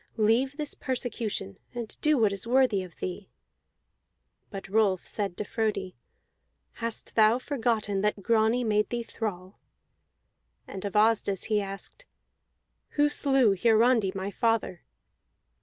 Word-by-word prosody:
Leave 235 Hz, +6 st, +2 dB
this 300 Hz, -2 st, -3 dB
persecution 230 Hz, -, -3 dB, 0.2 s
and 235 Hz, -2 st, -5 dB
do 305 Hz, -1 st, +3 dB
what 215 Hz, -4 st, +3 dB
is 200 Hz, +3 st, -6 dB
worthy 245 Hz, -5 st, +3 dB
of 180 Hz, -3 st, -10 dB
thee." 185 Hz, +2 st, -6 dB, 1.2 s
But 195 Hz, -2 st, -7 dB
Rolf 195 Hz, -2 st, +2 dB
said 200 Hz, -4 st, -3 dB
to -, -, -2 dB
Frodi: 205 Hz, -4 st, -2 dB, 0.9 s
"Hast 230 Hz, -1 st, -3 dB
thou 220 Hz, +1 st, +5 dB
forgotten 225 Hz, -7 st, -1 dB
that 210 Hz, -1 st, -1 dB
Grani 230 Hz, +2 st, +2 dB
made 210 Hz, -2 st, +1 dB
thee 240 Hz, -1 st, -2 dB
thrall?" 195 Hz, -5 st, -6 dB, 1.1 s
And 190 Hz, -, -7 dB
of 200 Hz, -, -4 dB
Asdis 210 Hz, -2 st, +2 dB
he 210 Hz, -, +3 dB
asked: 195 Hz, -, -8 dB, 0.9 s
"Who 295 Hz, 0 st, +4 dB
slew 270 Hz, -8 st, +3 dB
Hiarandi 225 Hz, -1 st, +3 dB
my 195 Hz, +1 st, -3 dB
father?" 225 Hz, -6 st, 0 dB
220 Hz, 125 wpm, -28 LUFS, 195-240 Hz, 1.2 s, thou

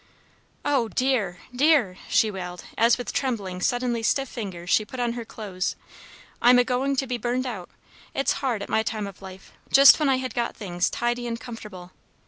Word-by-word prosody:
"Oh, 275 Hz, -5 st, +2 dB
dear, 220 Hz, -8 st, 0 dB, 0.2 s
dear!" 270 Hz, -, +3 dB
she 220 Hz, -, +3 dB
wailed, 180 Hz, -2 st, -7 dB
as 230 Hz, +1 st, +4 dB
with 245 Hz, -, -5 dB
trembling, 205 Hz, -9 st, -2 dB
suddenly 245 Hz, +1 st, 0 dB
stiff 270 Hz, +4 st, +1 dB
fingers 185 Hz, -7 st, -6 dB
she 215 Hz, -, +4 dB
put 240 Hz, +4 st, -9 dB
on 240 Hz, -1 st, 0 dB
her 235 Hz, -1 st, -5 dB
clothes. 200 Hz, -4 st, -4 dB, 0.7 s
"I'm 245 Hz, +1 st, +7 dB
a 245 Hz, -, +6 dB
going 260 Hz, +3 st, 0 dB
to 270 Hz, -, 0 dB
be 245 Hz, -2 st, -3 dB
burned 245 Hz, +3 st, -1 dB
out! 210 Hz, -8 st, -5 dB, 0.5 s
It's 275 Hz, -, +1 dB
hard, 240 Hz, -7 st, -1 dB
at -, -, -7 dB
my 220 Hz, -, +2 dB
time 220 Hz, -2 st, -3 dB
of 200 Hz, -1 st, -10 dB
life, 190 Hz, 0 st, -11 dB, 0.2 s
just 275 Hz, +2 st, +9 dB
when 300 Hz, -2 st, +2 dB
I 265 Hz, -, +4 dB
had 255 Hz, 0 st, -4 dB
got 235 Hz, -1 st, -2 dB
things 180 Hz, -5 st, -1 dB
tidy 240 Hz, 0 st, -2 dB
and 230 Hz, -1 st, -3 dB
comfortable. 210 Hz, -7 st, -9 dB
235 Hz, 190 wpm, -25 LUFS, 200-255 Hz, 0.7 s, just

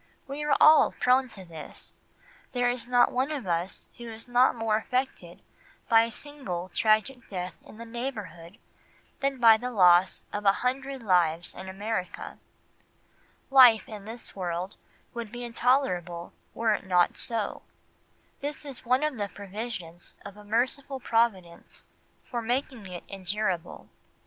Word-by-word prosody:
We 280 Hz, +2 st, -5 dB
are 295 Hz, -1 st, +2 dB
all 310 Hz, 0 st, +7 dB
prone 255 Hz, +1 st, +3 dB
to 195 Hz, -6 st, -12 dB
this, 160 Hz, -3 st, -11 dB, 0.6 s
there 245 Hz, -1 st, +2 dB
is 245 Hz, -1 st, -6 dB
not 245 Hz, -1 st, +4 dB
one 260 Hz, +3 st, 0 dB
of 280 Hz, -7 st, -4 dB
us 175 Hz, +1 st, -2 dB
who 235 Hz, -1 st, -7 dB
is 225 Hz, +2 st, -9 dB
not 245 Hz, +1 st, +4 dB
more 225 Hz, -2 st, 0 dB
affected 255 Hz, +4 st, -3 dB, 0.5 s
by 225 Hz, -2 st, +7 dB
a 230 Hz, -, -7 dB
single 210 Hz, -12 st, -6 dB
tragic 220 Hz, +3 st, +1 dB
death 180 Hz, -2 st, -4 dB
in -, -, -14 dB
the 230 Hz, -, -8 dB
neighbourhood 210 Hz, -8 st, -6 dB, 0.6 s
than 275 Hz, 0 st, 0 dB
by 225 Hz, -2 st, +8 dB
the 250 Hz, +3 st, -4 dB
loss 180 Hz, -4 st, +4 dB
of 205 Hz, -, -3 dB
a 195 Hz, -, +6 dB
hundred 265 Hz, 0 st, -2 dB
lives 175 Hz, -4 st, +2 dB
in 190 Hz, +1 st, -8 dB
America; 195 Hz, -1 st, -4 dB, 1.1 s
life 250 Hz, -5 st, +7 dB
in 210 Hz, -3 st, -9 dB
this 225 Hz, +2 st, -8 dB
world 180 Hz, 0 st, -3 dB, 0.4 s
would 235 Hz, -3 st, -6 dB
be 245 Hz, 0 st, -6 dB
intolerable 230 Hz, -9 st, 0 dB, 0.2 s
were 225 Hz, -1 st, +2 dB
it 200 Hz, -, -4 dB
not 180 Hz, -1 st, +3 dB
so, 225 Hz, -4 st, -3 dB, 0.8 s
this 290 Hz, +1 st, -5 dB
is 275 Hz, -3 st, -7 dB
one 255 Hz, +3 st, +2 dB
of 300 Hz, -6 st, -1 dB
the 205 Hz, -1 st, -2 dB
provisions 195 Hz, -4 st, -7 dB
of 200 Hz, -1 st, -9 dB
a 210 Hz, -, -13 dB
merciful 260 Hz, +5 st, -1 dB
providence 220 Hz, -8 st, -1 dB, 0.4 s
for 240 Hz, -, -4 dB
making 240 Hz, -2 st, -2 dB
it 180 Hz, -1 st, -8 dB
endurable. 190 Hz, -2 st, -3 dB
225 Hz, 150 wpm, -28 LUFS, 185-250 Hz, 1.1 s, by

